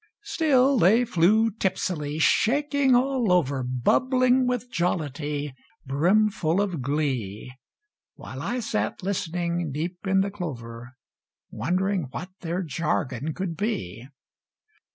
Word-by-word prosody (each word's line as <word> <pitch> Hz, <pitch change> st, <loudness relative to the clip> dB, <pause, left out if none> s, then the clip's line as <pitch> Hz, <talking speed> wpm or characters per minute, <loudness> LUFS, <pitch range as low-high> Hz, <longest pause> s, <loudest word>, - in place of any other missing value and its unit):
Still 280 Hz, -, +3 dB
they 220 Hz, +8 st, +5 dB
flew 220 Hz, +3 st, +3 dB
tipsily, 180 Hz, -7 st, -2 dB
shaking 275 Hz, -, +3 dB
all 255 Hz, -4 st, +2 dB
over, 140 Hz, -7 st, +2 dB
Bubbling 250 Hz, -, +2 dB
with 250 Hz, 0 st, -2 dB
jollity, 150 Hz, -4 st, -2 dB, 0.3 s
brimful 180 Hz, +4 st, +2 dB
of 185 Hz, -8 st, -1 dB
glee, 125 Hz, -6 st, -2 dB, 0.6 s
While -, -, -8 dB
I 245 Hz, +1 st, -2 dB
sat 215 Hz, -3 st, -2 dB
listening 175 Hz, -3 st, -2 dB
deep 170 Hz, +5 st, -4 dB
in 190 Hz, 0 st, +3 dB
the 200 Hz, +1 st, -1 dB
clover, 125 Hz, -, -7 dB, 0.6 s
Wondering 185 Hz, -2 st, -1 dB
what 180 Hz, +8 st, -7 dB
their 175 Hz, +2 st, -3 dB
jargon 150 Hz, -3 st, -2 dB
could 185 Hz, -3 st, -3 dB
be. 125 Hz, -, -3 dB
180 Hz, 110 wpm, -25 LUFS, 145-220 Hz, 0.6 s, they